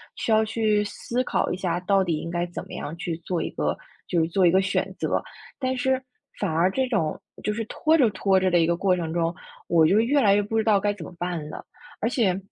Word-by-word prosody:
需 -, -, -4 dB
要 220 Hz, 0 st, +5 dB
去 215 Hz, -1 st, +1 dB
思 235 Hz, +4 st, -3 dB
考 -, -, 0 dB
一 -, -, -3 dB
下， 175 Hz, -2 st, -1 dB
到 195 Hz, +1 st, +3 dB
底 170 Hz, -4 st, -1 dB
应 165 Hz, -, -5 dB
该 175 Hz, 0 st, -1 dB
怎 175 Hz, -, -6 dB
么 -, -, -12 dB
样 150 Hz, -, -5 dB
去 170 Hz, -1 st, -3 dB
做 175 Hz, -1 st, -2 dB
一 -, -, -2 dB
个 -, -, -1 dB, 0.3 s
就 175 Hz, -, +1 dB
是 160 Hz, -, +2 dB
做 185 Hz, +2 st, +3 dB
一 -, -, +6 dB
个 190 Hz, -, +4 dB
选 190 Hz, +1 st, -1 dB
择， -, -, 0 dB, 0.4 s
但 260 Hz, -1 st, -1 dB
是 260 Hz, +1 st, +1 dB, 0.4 s
反 -, -, 0 dB
而 170 Hz, +4 st, +3 dB
这 265 Hz, +6 st, 0 dB
种 180 Hz, -11 st, -1 dB, 0.2 s
就 210 Hz, -, 0 dB
是 225 Hz, +2 st, -3 dB
拖 315 Hz, +8 st, +1 dB
着 255 Hz, -7 st, +4 dB
拖 195 Hz, -1 st, +2 dB
着 185 Hz, 0 st, +2 dB
的 175 Hz, -, +4 dB
一 165 Hz, -, +4 dB
个 170 Hz, +1 st, +1 dB
过 185 Hz, +2 st, +2 dB
程 165 Hz, -3 st, -3 dB
中， 170 Hz, 0 st, 0 dB, 0.3 s
我 165 Hz, -2 st, +4 dB
就 195 Hz, +7 st, +4 dB
越 270 Hz, +6 st, +3 dB
来 200 Hz, -5 st, +5 dB
越 205 Hz, -, +3 dB
不 210 Hz, +2 st, -2 dB
知 220 Hz, -, +2 dB
道 210 Hz, -3 st, +4 dB
该 205 Hz, -, +1 dB
怎 185 Hz, -6 st, -9 dB
么 -, -, -10 dB
办 175 Hz, -4 st, -3 dB
了。 -, -, -8 dB, 0.4 s
而 225 Hz, -, +1 dB
且 210 Hz, -8 st, +1 dB
190 Hz, 280 characters per minute, -25 LUFS, 170-220 Hz, 0.4 s, 一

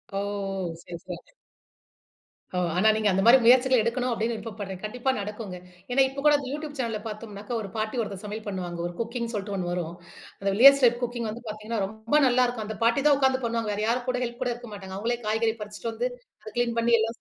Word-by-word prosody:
ஓ! -, -, 0 dB
ஓ! 195 Hz, -3 st, -3 dB
சரி, 175 Hz, -, -8 dB
சரி. 180 Hz, -2 st, -5 dB, 1.4 s
ஓ! -, -, 0 dB, 0.2 s
ஆனா 210 Hz, +5 st, +4 dB
நீங்க 220 Hz, -1 st, +1 dB
அந்த 190 Hz, +1 st, +2 dB
மாரி 240 Hz, +3 st, +9 dB
முயற்சிகள 255 Hz, +1 st, +6 dB
எடுக்கணும், 245 Hz, +2 st, 0 dB
அப்டின்னு 230 Hz, 0 st, -1 dB
விருப்பப்பட்றேன். 205 Hz, -4 st, -6 dB
கண்டிப்பா 245 Hz, +5 st, -2 dB
நடக்குங்க. 205 Hz, -2 st, -5 dB, 0.3 s
ஏனா 270 Hz, +2 st, +4 dB
இப்ப 270 Hz, -, -7 dB
கூட 300 Hz, -, +7 dB
இந்த 275 Hz, -, -6 dB
YouTube 300 Hz, 0 st, -5 dB
channelல 230 Hz, -4 st, -2 dB
பார்த்தோம்னாக்க, 210 Hz, 0 st, -8 dB
ஒரு 200 Hz, -, -6 dB
பாட்டி 215 Hz, +3 st, -2 dB
ஒருத்தர் 200 Hz, -3 st, -5 dB
சமையல் 215 Hz, +1 st, -6 dB
பண்ணுவாங்க. 180 Hz, -3 st, -4 dB
ஒரு 175 Hz, -, -7 dB
குக்கிங் 235 Hz, 0 st, -3 dB
சொல்ட்டு 205 Hz, -1 st, -3 dB
ஒண்ணு 180 Hz, -2 st, -2 dB
வரும். 175 Hz, -2 st, -3 dB, 0.5 s
அந்த 195 Hz, -, 0 dB
"வில்லேஜ் 275 Hz, +5 st, +8 dB
டைப் 240 Hz, 0 st, +5 dB
குக்கிங்" 240 Hz, -1 st, -2 dB
வந்து 235 Hz, +3 st, -7 dB
பாத்தீங்கன்னா, 215 Hz, +1 st, -4 dB
ரொம்ப 220 Hz, +7 st, -3 dB
நல்லா 250 Hz, 0 st, +4 dB
இருக்கும். 235 Hz, -3 st, -4 dB
அந்தப் 220 Hz, +1 st, -7 dB
பாட்டி 235 Hz, +4 st, +3 dB
தான் 285 Hz, -2 st, +5 dB
உக்காந்து 265 Hz, -1 st, +2 dB
பண்ணுவாங்க. 230 Hz, -1 st, -1 dB
வேற 205 Hz, -, -3 dB
யாரும் 245 Hz, +2 st, 0 dB
கூட 250 Hz, -, 0 dB
ஹெல்ப் 240 Hz, 0 st, -5 dB
கூட 245 Hz, -, 0 dB
இருக்க 240 Hz, 0 st, -10 dB
மாட்டாங்க. 190 Hz, -2 st, -8 dB
அவங்களே 235 Hz, +4 st, -1 dB
காய்கறி 225 Hz, +1 st, +1 dB
பறிச்சிட்டு 210 Hz, +1 st, -5 dB
வந்து, 245 Hz, +3 st, -1 dB, 0.3 s
அத 215 Hz, -, -7 dB
க்ளீன் 240 Hz, -1 st, +1 dB
பண்ணி 235 Hz, +1 st, +2 dB
எல்லாம் 225 Hz, +1 st, -1 dB
225 Hz, 215 wpm, -26 LUFS, 205-245 Hz, 1.4 s, மாரி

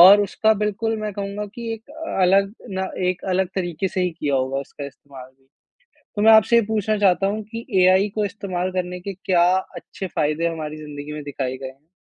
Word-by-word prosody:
और 195 Hz, +4 st, +10 dB
उसका 215 Hz, +2 st, +2 dB
बिल्कुल 215 Hz, +2 st, -1 dB
मैं 210 Hz, -1 st, -3 dB
कहूँगा 200 Hz, +1 st, -4 dB
कि 230 Hz, -1 st, -4 dB
एक 225 Hz, -, -12 dB, 0.4 s
अलग 195 Hz, +2 st, +4 dB, 0.2 s
ना 190 Hz, 0 st, -2 dB, 0.2 s
एक 180 Hz, -1 st, -2 dB
अलग 185 Hz, 0 st, +1 dB
तरीके 175 Hz, 0 st, -1 dB
से 185 Hz, -, -2 dB
ही 180 Hz, -, +1 dB
किया 145 Hz, -2 st, 0 dB
होगा 130 Hz, +1 st, 0 dB
उसका 140 Hz, +1 st, -8 dB
इस्तेमाल 135 Hz, -2 st, -12 dB
भी। 135 Hz, 0 st, -34 dB, 0.7 s
तो 205 Hz, -, -1 dB
मैं 220 Hz, +1 st, +7 dB
आपसे 220 Hz, +2 st, +6 dB
ये -, -, +6 dB
पूछना 215 Hz, -1 st, 0 dB
चाहता 195 Hz, -1 st, +3 dB
हूँ 215 Hz, +2 st, -2 dB
कि 230 Hz, 0 st, -6 dB, 0.2 s
एआई 190 Hz, +3 st, +5 dB
को 210 Hz, -1 st, +1 dB
इस्तेमाल 185 Hz, -3 st, -3 dB
करने 180 Hz, -1 st, -3 dB
के 195 Hz, +2 st, -5 dB
क्या 180 Hz, -2 st, +2 dB, 0.3 s
अच्छे 190 Hz, -, -7 dB
फायदे 155 Hz, +3 st, +1 dB
हमारी 155 Hz, -2 st, -4 dB
जिंदगी 150 Hz, -1 st, -7 dB
में 150 Hz, 0 st, -6 dB
दिखाए 135 Hz, -2 st, -3 dB
गए 135 Hz, 0 st, -6 dB
हैं? 135 Hz, +4 st, -15 dB
185 Hz, 205 wpm, -22 LUFS, 150-205 Hz, 0.7 s, और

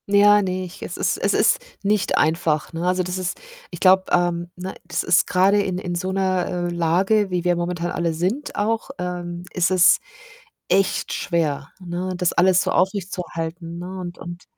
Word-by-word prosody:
Ja, 205 Hz, +1 st, +6 dB
ne, 185 Hz, -1 st, -2 dB
ich 180 Hz, +1 st, -12 dB
es -, -, -6 dB
ist -, -, 0 dB
es -, -, +1 dB
ist -, -, +3 dB, 0.2 s
nicht 200 Hz, -2 st, +1 dB
einfach, 160 Hz, 0 st, +1 dB
ne? 165 Hz, +2 st, -2 dB
Also, 185 Hz, 0 st, +1 dB
das 180 Hz, +1 st, -3 dB
ist 185 Hz, -1 st, -3 dB, 0.3 s
ich 175 Hz, -, -9 dB
glaube, 190 Hz, +1 st, +5 dB
ähm, 175 Hz, -1 st, +1 dB
ne, 185 Hz, +2 st, -6 dB
das 175 Hz, -, -2 dB
ist 175 Hz, -, +3 dB
grade 195 Hz, +3 st, +3 dB
in 185 Hz, -2 st, -2 dB
in 180 Hz, -1 st, -4 dB
so 185 Hz, +2 st, -2 dB
'ner, 185 Hz, -2 st, 0 dB
äh, -, -, -4 dB
Lage, 190 Hz, +5 st, +2 dB
wie 180 Hz, -2 st, -1 dB
wir 175 Hz, 0 st, +2 dB
momentan 175 Hz, 0 st, -2 dB
alle 170 Hz, -1 st, -1 dB
sind 190 Hz, -, -2 dB
auch, 225 Hz, +4 st, -1 dB
ähm, 175 Hz, -1 st, -5 dB
ist 180 Hz, 0 st, +2 dB
es 185 Hz, -2 st, +5 dB, 0.7 s
echt 195 Hz, -1 st, +1 dB
schwer, 150 Hz, -5 st, -1 dB
ne, 180 Hz, +1 st, -4 dB
das 180 Hz, -1 st, +1 dB
alles 185 Hz, +1 st, +4 dB
so -, -, -1 dB
aufrechtzuerhalten, 175 Hz, -3 st, -2 dB
ne? 185 Hz, +2 st, -7 dB
Und 175 Hz, -1 st, -7 dB
und 175 Hz, 0 st, -9 dB
180 Hz, 185 wpm, -22 LUFS, 175-190 Hz, 0.7 s, Ja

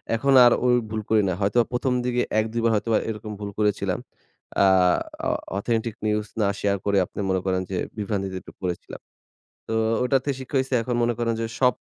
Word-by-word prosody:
এখন 135 Hz, +4 st, +2 dB
আর 120 Hz, -, +7 dB
ঐ -, -, +4 dB, 0.2 s
ভুল 110 Hz, 0 st, -3 dB
করি 110 Hz, -1 st, +4 dB
না। 90 Hz, -, 0 dB
হয়তো 100 Hz, +5 st, +1 dB
১ম 125 Hz, +1 st, 0 dB
দিকে 125 Hz, 0 st, +1 dB, 0.2 s
১-২ 110 Hz, +2 st, -1 dB
বার 115 Hz, -, +3 dB
হয়তোবা 110 Hz, +1 st, +1 dB
এরকম 105 Hz, 0 st, -5 dB
ভুল 105 Hz, -1 st, -5 dB
করেছিলাম। 105 Hz, -1 st, 0 dB, 0.6 s
অ্যা 100 Hz, -, +5 dB, 0.6 s
অ -, -, +2 dB, 0.3 s
অথেন্টিক 115 Hz, +1 st, -1 dB
নিউজ 105 Hz, 0 st, 0 dB, 0.2 s
না 100 Hz, -, +3 dB
শেয়ার 100 Hz, -1 st, +1 dB
করে 100 Hz, -1 st, +2 dB
আপনি -, -, -10 dB
মনে 95 Hz, 0 st, +2 dB
করেন 95 Hz, -1 st, +1 dB
যে, 95 Hz, -, -1 dB, 0.2 s
বিভ্রান্তিতে 100 Hz, -2 st, -2 dB
একটু -, -, -13 dB
পরেছিলাম। 90 Hz, -2 st, -5 dB, 0.7 s
তো 110 Hz, -, -3 dB, 0.3 s
ওটাতে 135 Hz, +2 st, +1 dB
শিক্ষা 130 Hz, +2 st, -7 dB
হইসে। 130 Hz, 0 st, -2 dB
এখন 120 Hz, +1 st, -2 dB
মনে 120 Hz, 0 st, +2 dB
করেন 115 Hz, -1 st, +1 dB
যে, 115 Hz, -, 0 dB
সব 125 Hz, -1 st, +4 dB
110 Hz, 190 wpm, -24 LUFS, 100-120 Hz, 0.7 s, আর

